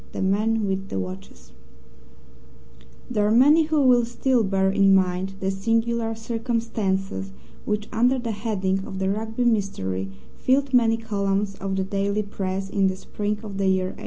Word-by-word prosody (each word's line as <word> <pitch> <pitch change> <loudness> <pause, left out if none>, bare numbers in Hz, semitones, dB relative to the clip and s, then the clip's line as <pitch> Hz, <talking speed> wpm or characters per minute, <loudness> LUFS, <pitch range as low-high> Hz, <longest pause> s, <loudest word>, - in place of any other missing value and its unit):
The - - -4
Man 215 +3 +1
with 195 0 -2
the - - -3
Watches 90 -8 -8 1.6
There 210 -4 +1
are - - +2
many 290 +7 +6
who 305 -2 +2
will 245 -2 +5
still 240 +1 +1
bear 190 -1 +1
in 195 0 +5
mind 190 +1 0
the 190 0 -1
singular 225 +3 0
circumstances 220 -4 -2 0.3
which, 210 0 -2
under 245 +4 +3
the 240 -2 -3
heading 195 -3 -1
of 190 - -6
the 190 0 0
Rugby 225 +4 -2
Mystery, 95 - -1 0.3
filled 270 +1 +1
many 230 -2 +4
columns 200 -2 -1
of 195 0 -4
the 190 - 0
daily 200 +2 -1
Press 195 -1 -4
in 195 0 +1
the 190 - -1
spring 210 +2 -3
of 200 -2 -6
the 195 - +1
year 185 -1 +1
1892. - - -16
205 Hz, 165 wpm, -24 LUFS, 190-225 Hz, 1.6 s, many